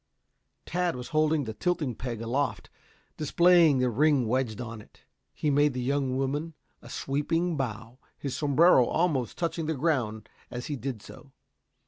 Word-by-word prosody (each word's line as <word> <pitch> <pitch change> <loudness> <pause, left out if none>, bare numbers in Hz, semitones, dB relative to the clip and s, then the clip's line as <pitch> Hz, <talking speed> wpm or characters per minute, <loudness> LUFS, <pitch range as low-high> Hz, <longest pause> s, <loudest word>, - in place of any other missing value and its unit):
Tad 175 -2 -1
was 125 -1 -7
holding 155 -1 +2
the 110 -3 -5
tilting 155 - -1
peg 115 -1 -5
aloft, 130 +5 -2 0.5
displaying 170 -1 +5
the 125 -1 +1
ring 140 0 +3
wedged 120 -2 -1
on 115 -2 -6
it. - - -21 0.3
He 150 - -1
made 145 0 +3
the - - -2
young 130 0 0
woman 145 +4 -2 0.3
a - - -13
sweeping 165 +5 -1
bow, 115 -2 -5 0.2
his 140 -3 -4
sombrero 145 -2 +5
almost 150 -9 0
touching 165 -2 -2
the 160 - -1
ground 125 -8 -1 0.2
as 125 0 -6
he 150 - -3
did 125 -4 -5
so. 140 - -13
140 Hz, 155 wpm, -28 LUFS, 125-155 Hz, 0.5 s, displaying